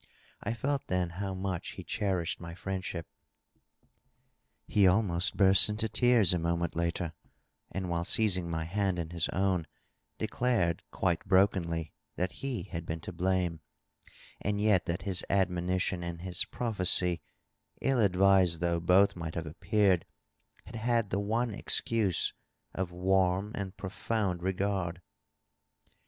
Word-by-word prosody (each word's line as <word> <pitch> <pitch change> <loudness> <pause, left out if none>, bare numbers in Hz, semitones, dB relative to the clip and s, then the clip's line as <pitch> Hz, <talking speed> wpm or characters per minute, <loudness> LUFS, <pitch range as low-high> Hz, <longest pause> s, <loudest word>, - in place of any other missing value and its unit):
I 115 - -2
felt 140 +4 -1
then 90 -1 0
how 95 +2 -4
much 95 -2 -3
he - - -8
cherished 90 -4 -1
my 85 -1 -8
friendship. 95 -3 -4 1.6
He 100 -2 +3
aknost 90 -2 +2
burst 95 0 +6
into 105 +1 -1
tears 110 -4 +4
a 90 - +1
moment 85 0 -1
later, 85 0 -1 0.6
and 95 -1 -3
while 85 -1 -1
seizing 90 -3 +2
my 80 -1 -2
hand 95 +2 0
in 85 -1 -4
his 85 -2 -1
own 95 -3 0 0.5
declared 110 -6 0
quite 90 -3 0
brokenly 85 -5 +2 0.2
that 90 0 -1
he 135 -4 -2
had 85 -4 -6
been 80 0 -4
to - - -7
blame, 90 -3 0 0.8
and 100 +1 -1
yet 105 -4 +3
iliat 85 +2 -2
his 95 -3 0
admonition 90 -1 +1
and 85 -1 -5
his 90 -1 +2
prophecy, 90 -6 0 0.6
ill 135 -2 +1
advised 95 -4 +4
though 85 0 +1
both 90 +4 +4
might 85 -2 -5
have 85 - -3
ap 80 +4 -10
peared, 100 -5 +2 0.6
had 115 - -8
had 115 -1 +1
the 100 - +1
one 115 +3 0
excuse 105 -2 +1 0.4
of 90 -2 -3
warm 95 +2 +1
and 100 -1 -5
profound 95 -1 -2
regard. 95 -2 -1
95 Hz, 140 wpm, -30 LUFS, 85-100 Hz, 1.6 s, burst